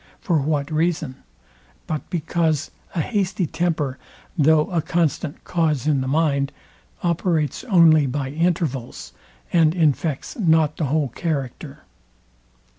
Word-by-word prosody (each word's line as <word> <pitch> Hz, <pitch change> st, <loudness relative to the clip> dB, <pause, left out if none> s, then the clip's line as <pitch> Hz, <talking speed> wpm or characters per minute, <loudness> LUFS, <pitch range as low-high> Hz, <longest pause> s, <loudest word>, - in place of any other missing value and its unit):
For 170 Hz, -4 st, +1 dB
what 145 Hz, 0 st, -1 dB
reason? 155 Hz, -4 st, -1 dB, 0.7 s
but 155 Hz, -2 st, -4 dB
because 160 Hz, -2 st, -1 dB, 0.2 s
a 165 Hz, -, +1 dB
hasty 190 Hz, -2 st, -1 dB
temper, 155 Hz, -6 st, -1 dB, 0.4 s
though 155 Hz, -1 st, +4 dB
a 170 Hz, -2 st, +1 dB
constant 160 Hz, -1 st, -1 dB
cause 155 Hz, -6 st, 0 dB
in 145 Hz, -3 st, +2 dB
the 130 Hz, -, -3 dB
mind, 140 Hz, -1 st, +1 dB, 0.5 s
operates 170 Hz, -3 st, 0 dB
only 165 Hz, -, +5 dB
by 135 Hz, 0 st, -3 dB
intervals, 145 Hz, -, -2 dB, 0.4 s
and 165 Hz, -1 st, +4 dB
infects 155 Hz, -3 st, 0 dB
not 160 Hz, -5 st, +3 dB
the 160 Hz, -, 0 dB
whole 145 Hz, 0 st, 0 dB
character. 140 Hz, -2 st, -4 dB
155 Hz, 115 wpm, -22 LUFS, 140-170 Hz, 0.7 s, only